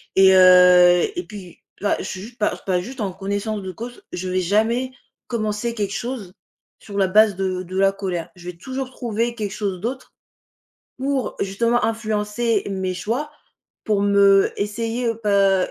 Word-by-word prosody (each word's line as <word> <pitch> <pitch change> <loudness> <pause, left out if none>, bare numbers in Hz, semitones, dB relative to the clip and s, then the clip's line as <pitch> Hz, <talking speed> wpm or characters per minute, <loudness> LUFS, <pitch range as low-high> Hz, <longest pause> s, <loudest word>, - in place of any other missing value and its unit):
et 190 0 +7
heu 180 -1 +7
et 355 - -3
puis, 195 -5 -11 0.2
là, 205 - +1
j - - -4
je - - -5
suis 185 - -6
jus 230 +4 -11
pas 210 -5 0
pas 185 -2 +1
juste 250 +8 -9
en 195 -3 -2
connaissance 200 +2 -3
de 190 -1 -6
cause. 235 +6 -9
Je 185 +1 -4
vais 185 0 0
jamais 220 +7 +1 0.4
commencer 215 0 -2
quelque 205 -3 -3
chose, 235 -7 -5 0.5
sur 200 -1 -9
la 190 - +3
base 210 +1 +4
de 185 -1 -2
de 185 +1 -7
la 195 0 +4
colère. 185 -4 -4
Je 175 0 -9
vais 170 - -21
toujours 260 +7 -5
trouver 235 -1 -2
quelque 210 -4 -4
chose 195 -3 -3
d'autre, 250 +4 -5 0.9
pour, 270 0 -1
justement, 230 +5 +1
influencer 220 0 -1
mes 190 -1 -2
choix, 235 - -3 0.5
pour 210 -2 +1
me 200 -1 +4
essayer, 230 +4 -2
heu, 230 - -1
pas 200 -3 +2
205 Hz, 175 wpm, -21 LUFS, 190-230 Hz, 0.9 s, et